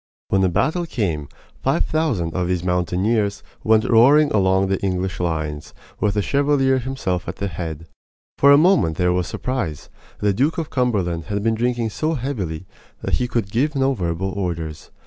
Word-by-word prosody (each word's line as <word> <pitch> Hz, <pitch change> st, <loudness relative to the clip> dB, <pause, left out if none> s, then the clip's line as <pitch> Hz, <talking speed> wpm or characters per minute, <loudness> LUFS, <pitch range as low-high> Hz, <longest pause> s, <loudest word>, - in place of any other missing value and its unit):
When 95 Hz, -, +2 dB
the 95 Hz, -, +3 dB
battle 170 Hz, -, 0 dB
came 85 Hz, -, -2 dB, 0.3 s
five -, -, +1 dB
thousand 120 Hz, -, -1 dB
of 90 Hz, -1 st, -1 dB
these 90 Hz, -1 st, -1 dB
mountaineers 95 Hz, +4 st, 0 dB, 0.2 s
went 110 Hz, 0 st, +4 dB
roaring 140 Hz, +6 st, +5 dB
along 95 Hz, -2 st, +3 dB
the 95 Hz, 0 st, -1 dB
English 95 Hz, -1 st, -2 dB
lines, 80 Hz, -4 st, -3 dB, 0.2 s
with 105 Hz, -1 st, +1 dB
the 105 Hz, -, +1 dB
Chevalier 140 Hz, -1 st, +2 dB
himself 120 Hz, -9 st, -3 dB
at -, -, -4 dB
their 100 Hz, -, -3 dB
head. 80 Hz, -2 st, -6 dB, 0.5 s
For 140 Hz, -, +7 dB
a 140 Hz, -, +8 dB
moment 155 Hz, -, +3 dB
there 90 Hz, 0 st, +2 dB
was 90 Hz, -1 st, -1 dB
surprise. 110 Hz, -, -4 dB, 0.3 s
The 105 Hz, -1 st, +2 dB
Duke 140 Hz, +10 st, +1 dB
of 165 Hz, -2 st, -3 dB
Cumberland 95 Hz, -10 st, 0 dB
had 100 Hz, 0 st, -3 dB
been 115 Hz, 0 st, +2 dB
drinking 120 Hz, 0 st, -1 dB
so 155 Hz, +8 st, -1 dB
heavily 100 Hz, -, -4 dB, 0.4 s
that -, -, 0 dB
he 125 Hz, -, 0 dB
could 115 Hz, -5 st, -2 dB
give 145 Hz, +7 st, 0 dB
no 135 Hz, 0 st, +2 dB
verbal 90 Hz, -2 st, -2 dB
orders. 85 Hz, -5 st, -4 dB
100 Hz, 175 wpm, -21 LUFS, 90-130 Hz, 0.5 s, a